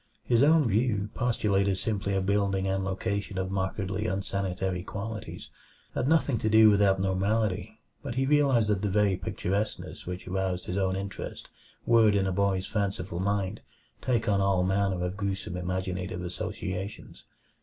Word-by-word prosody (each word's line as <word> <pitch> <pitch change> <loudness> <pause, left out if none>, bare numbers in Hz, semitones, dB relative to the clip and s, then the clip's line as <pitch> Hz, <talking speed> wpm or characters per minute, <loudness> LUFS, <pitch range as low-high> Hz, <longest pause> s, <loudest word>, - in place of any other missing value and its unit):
His 120 -1 +3
own 150 -1 +5
view, 105 -1 +1
postulating 100 -5 +1
simply 100 0 -1
a 95 - +1
building 100 0 +1
and 95 0 0
location 95 +1 -2
of 95 0 -2
markedly 95 +2 -2
unsanitary 95 -2 -2
qualities, 105 +2 -6 0.4
had 125 - -1
nothing 145 -6 +3
to 110 - 0
do 110 0 +7
with 100 0 +3
abnormality; 100 +2 +1 0.2
but 130 -5 -5
he 135 +1 +1
realized 135 -6 +3
that 100 -3 +1
the 105 - 0
very 100 -1 +3
picturesqueness 100 +3 -3
which 90 +1 -5
aroused 95 -1 -2
his 90 - -4
own 95 -1 +1
interest 95 0 -6 0.4
would 115 -3 +5
in 100 -1 +2
a 95 - 0
boy's 95 0 +1
fanciful 95 -4 -2
mind 100 +1 -1 0.4
take 120 -3 0
on 100 -2 +3
all 95 -2 +2
manner 95 -1 +1
of 90 +2 -4
gruesome 100 -3 -3
imaginative 90 0 -3
associations. 95 +2 -5
100 Hz, 155 wpm, -28 LUFS, 95-105 Hz, 0.4 s, do